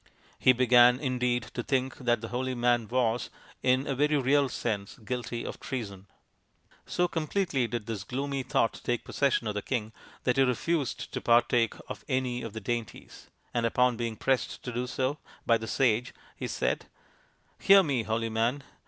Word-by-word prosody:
He 130 Hz, -, +6 dB
began, 125 Hz, 0 st, +5 dB
indeed, 125 Hz, -3 st, 0 dB
to 120 Hz, -, -2 dB
think 130 Hz, +1 st, -1 dB
that 120 Hz, -3 st, +1 dB
the 115 Hz, -, -6 dB
holy 130 Hz, +1 st, -2 dB
man 120 Hz, -2 st, +2 dB
was, 120 Hz, -1 st, 0 dB, 0.3 s
in 130 Hz, +1 st, +2 dB
a 140 Hz, -, -1 dB
very 150 Hz, +3 st, +2 dB
real 140 Hz, +1 st, +3 dB
sense, 105 Hz, -5 st, -3 dB
guilty 120 Hz, 0 st, -4 dB
of -, -, -6 dB
treason. 100 Hz, -7 st, -6 dB, 0.8 s
So 180 Hz, -, +1 dB
completely 160 Hz, -5 st, -1 dB
did 115 Hz, -2 st, -4 dB
this 110 Hz, -4 st, -4 dB
gloomy 135 Hz, +6 st, -3 dB
thought 115 Hz, -2 st, 0 dB
take 120 Hz, -1 st, -1 dB
possession 140 Hz, -4 st, +1 dB
of 105 Hz, -, -1 dB
the 105 Hz, -, -2 dB
king, 110 Hz, -3 st, -3 dB, 0.3 s
that 125 Hz, +1 st, +1 dB
he -, -, +5 dB
refused 135 Hz, +3 st, -1 dB
to -, -, -3 dB
partake 120 Hz, -1 st, +3 dB
of -, -, -7 dB
any 125 Hz, -1 st, -1 dB
of 115 Hz, -, -6 dB
the 110 Hz, -, -5 dB
dainties, 115 Hz, +1 st, -5 dB, 0.2 s
and 120 Hz, -, 0 dB
upon 125 Hz, +1 st, +3 dB
being 115 Hz, -1 st, -3 dB
pressed 130 Hz, +3 st, -1 dB
to 125 Hz, -, -4 dB
do 125 Hz, +1 st, -2 dB
so 130 Hz, +3 st, -1 dB, 0.3 s
by 115 Hz, -1 st, +4 dB
the 110 Hz, -, -6 dB
sage, 125 Hz, -2 st, +1 dB, 0.2 s
he -, -, -4 dB
said: -, -, -1 dB, 0.4 s
" -, -, -38 dB
Hear 195 Hz, 0 st, +7 dB
me, 140 Hz, -7 st, 0 dB
holy 115 Hz, +1 st, -1 dB
man 115 Hz, +5 st, 0 dB
125 Hz, 180 wpm, -29 LUFS, 115-130 Hz, 0.8 s, Hear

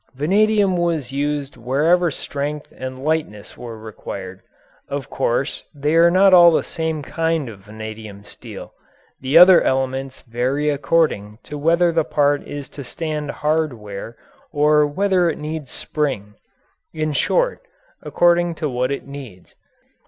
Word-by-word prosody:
Vanadium 200 Hz, +5 st, +2 dB
was 165 Hz, -6 st, -1 dB
used 145 Hz, -1 st, -2 dB
wherever 155 Hz, +9 st, +2 dB
strength 145 Hz, 0 st, -5 dB
and 130 Hz, 0 st, -7 dB
lightness 150 Hz, -10 st, -2 dB
were 115 Hz, -2 st, -8 dB
required. 100 Hz, -3 st, -8 dB, 0.5 s
Of 140 Hz, -2 st, -5 dB
course 125 Hz, +4 st, -1 dB
they 145 Hz, +2 st, -1 dB
are 165 Hz, +1 st, +6 dB
not 190 Hz, +2 st, +5 dB
all 175 Hz, -1 st, +9 dB
the 165 Hz, -, +2 dB
same 160 Hz, -2 st, -3 dB
kind 165 Hz, -2 st, -1 dB
of 105 Hz, -4 st, -9 dB
vanadium 110 Hz, -1 st, -9 dB
steel. -, -, -11 dB, 0.5 s
The 135 Hz, +4 st, +2 dB
other 180 Hz, +1 st, +9 dB
elements 130 Hz, 0 st, -1 dB
vary 130 Hz, +5 st, -1 dB
according 140 Hz, -8 st, 0 dB
to 150 Hz, -, -8 dB
whether 170 Hz, +4 st, +2 dB
the 165 Hz, -1 st, +1 dB
part 145 Hz, -1 st, +1 dB
is 145 Hz, -1 st, -6 dB
to 140 Hz, -, -9 dB
stand 150 Hz, +2 st, -4 dB
hard 155 Hz, 0 st, 0 dB
wear 105 Hz, +1 st, -9 dB, 0.3 s
or 150 Hz, 0 st, +3 dB
whether 185 Hz, +2 st, +1 dB
it 155 Hz, -, -3 dB
needs 150 Hz, -2 st, -5 dB
spring 130 Hz, -11 st, -3 dB, 0.6 s
in 155 Hz, -1 st, -2 dB
short, -, -, +1 dB, 0.4 s
according 175 Hz, -1 st, +2 dB
to 155 Hz, -1 st, -2 dB
what 125 Hz, +1 st, -1 dB
it 140 Hz, -, -4 dB
needs. 130 Hz, -10 st, -11 dB
145 Hz, 140 wpm, -20 LUFS, 130-165 Hz, 0.6 s, all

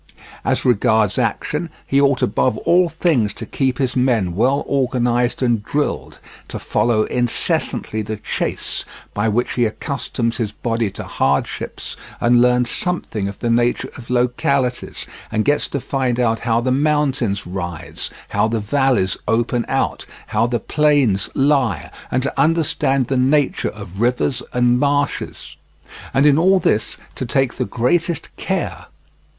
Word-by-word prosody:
As -, -, 0 dB
regards 110 Hz, -4 st, +3 dB
action, 160 Hz, +3 st, -1 dB, 0.2 s
he 140 Hz, +1 st, +2 dB
ought 140 Hz, -2 st, +2 dB
above 130 Hz, -, +1 dB
all 175 Hz, 0 st, +4 dB
things 155 Hz, -, +1 dB
to 115 Hz, -, -6 dB
keep 130 Hz, +2 st, -1 dB
his 130 Hz, -2 st, -1 dB
men 120 Hz, -9 st, +2 dB
well 130 Hz, +9 st, +2 dB
organized 125 Hz, -2 st, +1 dB
and 120 Hz, -4 st, +1 dB
drilled, 145 Hz, +7 st, -2 dB, 0.3 s
to -, -, -6 dB
follow 115 Hz, -2 st, +1 dB
incessantly 120 Hz, -2 st, -1 dB
the 110 Hz, 0 st, -4 dB
chase, -, -, -2 dB, 0.3 s
by 105 Hz, +2 st, 0 dB
which 120 Hz, +3 st, 0 dB
he 120 Hz, -, +2 dB
accustoms 115 Hz, 0 st, -2 dB
his 110 Hz, -5 st, -2 dB
body 115 Hz, -2 st, -1 dB
to -, -, -7 dB
hardships, 70 Hz, +1 st, -2 dB, 0.2 s
and 120 Hz, 0 st, +4 dB
learns 125 Hz, 0 st, +3 dB
something 140 Hz, -, -2 dB
of 100 Hz, -, -6 dB
the 120 Hz, -, -1 dB
nature 120 Hz, +1 st, +1 dB
of 120 Hz, -2 st, -11 dB
localities, 125 Hz, +1 st, 0 dB, 0.3 s
and 110 Hz, 0 st, 0 dB
gets 145 Hz, +1 st, +2 dB
to 140 Hz, -, -3 dB
find 130 Hz, -2 st, -1 dB
out 115 Hz, -2 st, +2 dB
how 115 Hz, 0 st, +1 dB
the 130 Hz, +1 st, 0 dB
mountains 135 Hz, -7 st, +1 dB
rise, 85 Hz, -2 st, -4 dB, 0.2 s
how -, -, +2 dB
the 115 Hz, 0 st, -1 dB
valleys 120 Hz, -3 st, +1 dB
open 115 Hz, +2 st, +1 dB
out, -, -, -1 dB, 0.2 s
how 110 Hz, +2 st, +1 dB
the 120 Hz, -1 st, -1 dB
plains 140 Hz, -8 st, +2 dB
lie, 135 Hz, -, +1 dB, 0.2 s
and 130 Hz, -, 0 dB
to 140 Hz, -, 0 dB
understand 150 Hz, -4 st, +2 dB
the 135 Hz, +2 st, -1 dB
nature 135 Hz, +2 st, +2 dB
of 100 Hz, -2 st, -8 dB
rivers 125 Hz, +2 st, +1 dB
and 125 Hz, 0 st, +3 dB
marshes, 145 Hz, 0 st, -1 dB, 0.5 s
and 135 Hz, +2 st, +3 dB
in 145 Hz, 0 st, +5 dB
all 190 Hz, +3 st, +4 dB
this 110 Hz, -10 st, 0 dB, 0.2 s
to -, -, -4 dB
take 130 Hz, +1 st, +1 dB
the 125 Hz, -, -2 dB
greatest 165 Hz, +8 st, -1 dB
care. -, -, -3 dB
125 Hz, 150 wpm, -19 LUFS, 115-140 Hz, 0.5 s, in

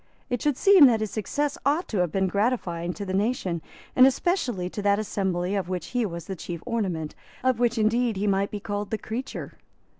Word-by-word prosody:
It 245 Hz, -, -1 dB
should 295 Hz, -3 st, +1 dB
seem 385 Hz, -8 st, +8 dB
that 230 Hz, -3 st, +3 dB
his 215 Hz, -, -2 dB
success 285 Hz, +7 st, -2 dB
ought 300 Hz, +6 st, +1 dB
to 210 Hz, -, -1 dB
have 175 Hz, -3 st, +1 dB
been 190 Hz, -1 st, +1 dB
gratifying 190 Hz, -4 st, 0 dB
to 200 Hz, -, -6 dB
the 185 Hz, -, -4 dB
nation, 195 Hz, -5 st, 0 dB, 0.3 s
and 255 Hz, +1 st, +8 dB
especially 260 Hz, -, 0 dB
to 205 Hz, -, -5 dB
that 200 Hz, 0 st, +3 dB
assembly 190 Hz, -3 st, -1 dB
of 195 Hz, -3 st, -2 dB
which 180 Hz, -1 st, -3 dB
he 245 Hz, -3 st, 0 dB
was 170 Hz, -2 st, -7 dB
the 190 Hz, -, -5 dB
chief 170 Hz, -1 st, -7 dB
ornament, 190 Hz, -10 st, -2 dB, 0.3 s
of 255 Hz, -3 st, +2 dB
which 240 Hz, -1 st, +2 dB
indeed 225 Hz, +1 st, +2 dB
he 200 Hz, -, -1 dB
might 200 Hz, 0 st, +1 dB
be 210 Hz, -, -5 dB
called 205 Hz, 0 st, -4 dB
the 220 Hz, -, -1 dB
creature. 235 Hz, +5 st, -6 dB
210 Hz, 210 wpm, -26 LUFS, 185-245 Hz, 0.3 s, seem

